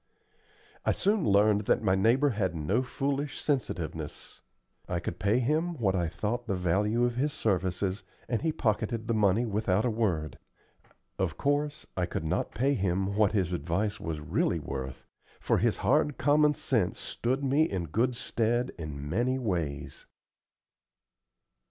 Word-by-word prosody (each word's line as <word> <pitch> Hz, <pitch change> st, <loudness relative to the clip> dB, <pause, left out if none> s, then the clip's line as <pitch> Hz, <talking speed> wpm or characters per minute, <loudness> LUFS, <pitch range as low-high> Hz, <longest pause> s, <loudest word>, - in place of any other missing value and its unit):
I -, -, +2 dB
soon 200 Hz, -, +1 dB
learned 105 Hz, +1 st, +4 dB
that -, -, +2 dB
my 95 Hz, -3 st, +3 dB
neighbor 115 Hz, +9 st, +3 dB
had 95 Hz, -6 st, -1 dB
no 90 Hz, +10 st, +1 dB
foolish 140 Hz, +3 st, -2 dB
sensitiveness. 85 Hz, -, -3 dB, 0.5 s
I 90 Hz, -, 0 dB
could 85 Hz, 0 st, -5 dB
pay 100 Hz, +4 st, +2 dB
him 155 Hz, +7 st, 0 dB
what 100 Hz, -7 st, +1 dB
I 85 Hz, -2 st, +1 dB
thought 115 Hz, +7 st, -3 dB
the 100 Hz, -, 0 dB
value 100 Hz, +7 st, +1 dB
of 120 Hz, 0 st, -2 dB
his 145 Hz, +3 st, 0 dB
services, 95 Hz, 0 st, 0 dB, 0.3 s
and 115 Hz, -1 st, -1 dB
he 160 Hz, -, +1 dB
pocketed 115 Hz, -3 st, -1 dB
the 115 Hz, -, +1 dB
money 105 Hz, +2 st, +3 dB
without 105 Hz, -1 st, +1 dB
a 120 Hz, -, +2 dB
word. 90 Hz, -, -1 dB, 0.8 s
Of 85 Hz, -5 st, -1 dB
course, 145 Hz, +2 st, 0 dB
I 90 Hz, -2 st, 0 dB
could 80 Hz, -, -4 dB
not 90 Hz, +4 st, 0 dB
pay 135 Hz, +5 st, +2 dB
him 95 Hz, -3 st, 0 dB
what 105 Hz, -1 st, +3 dB
his 90 Hz, -4 st, +1 dB
advice 95 Hz, +7 st, -1 dB
was 80 Hz, -2 st, -4 dB
really 75 Hz, -, 0 dB
worth, 65 Hz, -1 st, -6 dB, 0.3 s
for -, -, +1 dB
his -, -, +1 dB
hard 150 Hz, +1 st, +3 dB
common 150 Hz, +1 st, +4 dB
sense -, -, 0 dB
stood 130 Hz, +4 st, -2 dB
me 140 Hz, +4 st, +3 dB
in 95 Hz, -3 st, -2 dB
good 115 Hz, -, 0 dB
stead 120 Hz, +1 st, 0 dB
in 75 Hz, -3 st, -6 dB
many 120 Hz, -, +1 dB
ways. 85 Hz, -, -3 dB
105 Hz, 155 wpm, -29 LUFS, 90-125 Hz, 0.8 s, learned